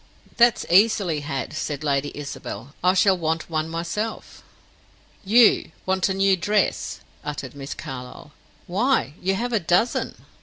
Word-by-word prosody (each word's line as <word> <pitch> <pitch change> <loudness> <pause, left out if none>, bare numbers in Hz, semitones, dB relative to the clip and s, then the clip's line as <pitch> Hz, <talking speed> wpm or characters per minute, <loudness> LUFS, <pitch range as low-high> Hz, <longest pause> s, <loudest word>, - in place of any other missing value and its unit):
"That's 240 -3 +4
easily 190 -4 +3
had," 140 -2 -4
said 155 -1 -4
Lady 145 -1 0
Isabel. 145 -1 -7
"I 185 +1 +4
shall 190 0 +4
want 165 -1 -2
one 155 0 -1
myself." 170 +7 -4 0.8
"You 215 -5 +4
want 190 +1 +1
a 190 - -1
new 195 0 +4
dress!" 205 - 0 0.2
uttered 140 -3 -5
Miss 140 0 -7
Carlyle. 130 0 -8 0.3
"Why, 205 - +1
you 190 +1 +1
have 245 +4 -2
a 225 - +3
dozen!" 180 +7 0
175 Hz, 140 wpm, -23 LUFS, 150-200 Hz, 0.8 s, That's